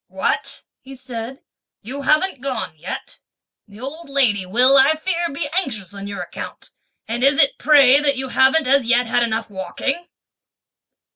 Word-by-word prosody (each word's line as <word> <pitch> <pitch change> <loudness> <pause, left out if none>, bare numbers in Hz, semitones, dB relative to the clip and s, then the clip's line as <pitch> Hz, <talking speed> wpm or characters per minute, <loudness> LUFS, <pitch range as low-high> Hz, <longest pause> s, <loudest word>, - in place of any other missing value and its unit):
"What," - - -2 0.2
he 270 0 -12
said, 255 +1 -8 0.4
"you 265 +6 -6
haven't 305 +1 +1
gone 250 -11 -4
yet! 160 +4 -8 0.5
the 205 +1 -15
old 280 +5 -7
lady 230 -9 +1
will 250 +7 +4
I 275 +3 +5
fear 340 +1 -2
be 290 +2 -4
anxious 220 - -2
on 200 0 -7
your 200 -3 -5
account; - - -9 0.4
and 235 +2 -3
is 275 +1 +3
it 275 - +3
pray 280 -3 +6
that 285 -2 +1
you 265 0 0
haven't 265 +5 +3
as 270 -2 +3
yet 245 0 +3
had 230 +1 0
enough 225 -1 -2
walking?" 275 - -4
265 Hz, 160 wpm, -20 LUFS, 225-280 Hz, 0.5 s, pray